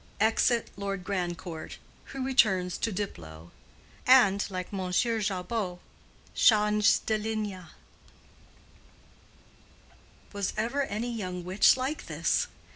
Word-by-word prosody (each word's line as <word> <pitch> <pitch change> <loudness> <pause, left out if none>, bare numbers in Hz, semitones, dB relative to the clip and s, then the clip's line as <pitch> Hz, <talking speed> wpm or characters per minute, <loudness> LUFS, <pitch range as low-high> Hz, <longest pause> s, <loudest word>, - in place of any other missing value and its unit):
Exit 225 +2 +2
Lord 195 -1 -4
Grandcourt, 175 -3 -4 0.3
who 270 -1 -5
returns 190 -9 +2
to 225 - -1
Diplow, 85 - -6 0.6
and, 205 -6 +6
like 185 0 -6
M. 185 -2 -3
Jabot, 205 -2 -1 0.6
change 210 -2 +4
de 220 -1 0
linge." 215 -1 -3 2.8
Was 200 -2 -2
ever 240 +6 0
any 235 +2 -3
young 180 -4 -5
witch 190 +7 +4
like 265 +4 -3
this? - - 0
205 Hz, 100 wpm, -28 LUFS, 185-225 Hz, 2.8 s, and